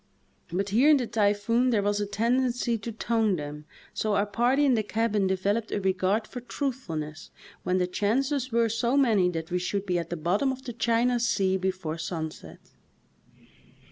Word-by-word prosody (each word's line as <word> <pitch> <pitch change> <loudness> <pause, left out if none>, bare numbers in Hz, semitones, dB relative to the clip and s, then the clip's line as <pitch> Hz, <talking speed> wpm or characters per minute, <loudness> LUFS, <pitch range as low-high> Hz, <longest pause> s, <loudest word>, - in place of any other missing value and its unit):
But 195 +3 -1
here 245 +9 +4
in 300 - +7
the 250 - -1
typhoon 225 +3 +1
there 215 -5 +2
was 205 0 0
a 205 - -2
tendency 240 +3 0
to 225 +1 -5
"tone" 225 -2 +1
them, 150 -1 -7 0.3
so 215 -1 0
our 200 - +2
party 245 +7 +2
in 270 - +4
the 225 - +2
cabin 215 -2 0
developed 200 +4 -1
a - - 0
regard 190 +3 +1
for 245 - -8
truthfulness 185 - -4 0.3
when 180 +1 0
the 180 - +2
chances 260 +8 0
were 230 0 +3
so 235 +4 0
many 220 -10 +4
that 165 -1 -5
we 180 - +1
should 195 +2 -2
be 180 -2 0
at 170 -1 -5
the 175 - -3
bottom 190 - +1
of 260 0 -7
the 240 - -5
China 235 +1 +1
sea 195 -5 +1
before 185 -4 -3
sunset. 160 -1 -6
210 Hz, 180 wpm, -27 LUFS, 185-240 Hz, 0.3 s, in